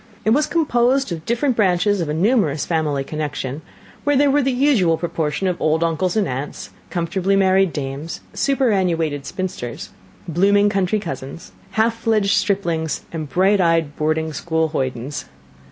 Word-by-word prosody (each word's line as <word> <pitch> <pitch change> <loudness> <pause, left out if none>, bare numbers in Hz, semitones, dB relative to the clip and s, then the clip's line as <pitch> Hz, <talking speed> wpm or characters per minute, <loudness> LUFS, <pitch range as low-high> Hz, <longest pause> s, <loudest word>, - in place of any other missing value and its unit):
It 220 - +3
was 295 +5 +3
composed 270 - +1
of 165 -2 -6
different 240 +2 +1
branches 195 -1 +2
of 160 - -2
a - - -1
numerous 170 - +2
family 155 -4 0
connection, 150 -1 -4 0.4
where 290 0 +2
there 285 0 +4
were 290 +1 +3
the 270 0 +1
usual 245 - +3
proportion 165 0 -2
of 180 -1 -2
old 160 +1 +2
uncles 170 +4 0
and 210 - +2
aunts, 135 +3 -5 0.2
comfortably 185 +2 0
married 190 -1 +3
dames, 145 +2 -5
superannuated 180 - 0
spinsters, 185 - -5 0.4
blooming 200 +5 +3
country 195 +1 0
cousins, 135 - -7 0.2
half 225 +1 +2
fledged 220 -3 +1
striplings, 170 -8 0
and 155 -3 -4
bright 190 +6 +3
eyed 165 -4 +1
boarding 155 +1 -1
school 160 +1 -1
hoydens. 130 -1 -3
175 Hz, 150 wpm, -20 LUFS, 155-210 Hz, 0.4 s, there